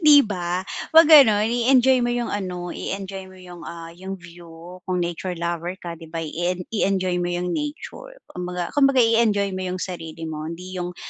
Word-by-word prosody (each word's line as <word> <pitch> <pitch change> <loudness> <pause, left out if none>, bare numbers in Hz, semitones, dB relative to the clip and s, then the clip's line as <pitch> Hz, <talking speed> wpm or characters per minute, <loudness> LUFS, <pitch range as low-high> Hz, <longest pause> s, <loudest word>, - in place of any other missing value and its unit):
'di 295 -4 +7
ba? 180 -2 -3 0.2
Huwag 325 +1 +8
gano'n, 220 -8 +8
i-enjoy 255 +1 +4
mo 240 - +1
'yung 240 0 -2
ano, 180 -3 -4
i-enjoy 195 -1 -6
mo 185 - -15
'yung, 180 -2 -12
ah, 165 0 -9
'yung 190 +3 -7
view 170 0 -13
kung 180 -1 0
nature 175 +1 -4
lover 170 +1 -3
ka, 170 -3 -8
'di 165 - -11
ba? 165 0 -4
I-en 175 +3 -2
i-enjoy 185 -4 0
mo 175 - -1
'yung 175 0 -2
nature, 310 - -6 0.2
kumbaga 180 -1 -4
kumbaga 275 -2 +3
i-enjoy 220 -4 +2
mo 185 0 -3
'yung 180 - -3
sarili 165 -3 -6
mo. 155 0 -5
Hindi 180 +2 -7
'yung, 175 0 -5
180 Hz, 185 wpm, -23 LUFS, 175-210 Hz, 0.2 s, Huwag